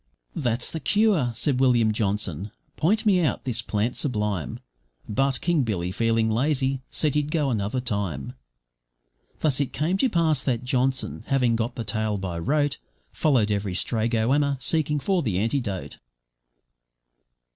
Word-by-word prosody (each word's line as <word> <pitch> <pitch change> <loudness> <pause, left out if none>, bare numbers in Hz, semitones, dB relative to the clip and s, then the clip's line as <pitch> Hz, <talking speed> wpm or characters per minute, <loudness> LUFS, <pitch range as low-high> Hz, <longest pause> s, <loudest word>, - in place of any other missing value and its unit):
`That's 120 -2 0
the 160 - -4
cure,' 200 - +2
said 130 +2 +1
William 120 -4 +4
Johnson, 105 -3 -1 0.3
`point 210 +8 +1
me 190 -4 +4
out 155 - 0
this 120 -3 -1
plant 110 +2 -1
sublime,' 105 - -2 0.5
But 135 +5 +1
King 170 -3 +2
Billy, 95 -7 -2
feeling 115 +2 +1
lazy, 130 +3 0
said 150 -3 +1
he'd 150 -1 0
go 150 -4 +1
another 105 +2 -1
time. 100 - -3 1.1
Thus 145 -3 +2
it 140 - -2
came 165 +7 0
to 260 +6 +2
pass 160 - +1
that 125 -3 -1
Johnson, 130 +1 0
having 125 -5 +2
got 115 +2 -2
the 115 - -3
tale 110 0 -1
by 90 -3 -4
rote, 145 - 0 0.3
Followed 125 -9 +2
every 100 -2 -1
stray 110 +3 0
goanna, 135 +5 +1
seeking 150 +1 +1
for 185 +5 +1
the 105 - -1
antidote. 105 - -2
125 Hz, 145 wpm, -25 LUFS, 105-145 Hz, 1.1 s, William